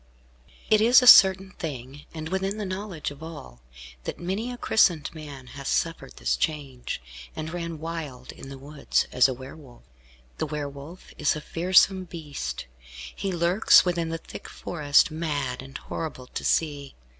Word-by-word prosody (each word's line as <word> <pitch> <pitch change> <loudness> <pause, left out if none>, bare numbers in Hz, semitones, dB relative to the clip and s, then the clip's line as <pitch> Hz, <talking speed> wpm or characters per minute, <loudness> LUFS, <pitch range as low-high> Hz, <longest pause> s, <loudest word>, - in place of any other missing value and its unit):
It 215 -1 +6
is 245 +3 +7
a - - +2
certain 190 -5 +8
thing, 140 -2 -7
and 160 -1 -6
within 190 +2 -1
the 210 - -3
knowledge 185 -5 -4
of 145 +1 -12
all, 105 - -10 0.4
that - - -4
many 195 +8 -3
a 245 - -7
christened 175 -11 +2
man 145 -5 -9
has 140 -1 -7
suffered 165 - -1
this - - 0
change, 135 - -3 0.4
and 160 +1 -5
ran 170 -2 -4
wild 155 -6 -6
in 135 0 -10
woods, 145 +2 -1
as 125 +1 +5
a 130 - -2
Were 130 +2 -10
Wolf. 135 -6 -16 0.6
The 155 - -1
Were 150 -1 -3
Wolf 140 +6 -11
is 145 - +2
a - - -4
fearsome 185 +4 +3
beast. 145 - -6 0.5
He 195 -1 -3
lurks 175 +5 +5
within 170 -2 0
the 165 - -2
thick - - -10
forest, 150 -2 +2
mad 145 -6 -2
and 135 +1 -8
horrible 155 -6 -6
to - - -6
see. 145 -3 0
155 Hz, 165 wpm, -26 LUFS, 140-180 Hz, 0.6 s, certain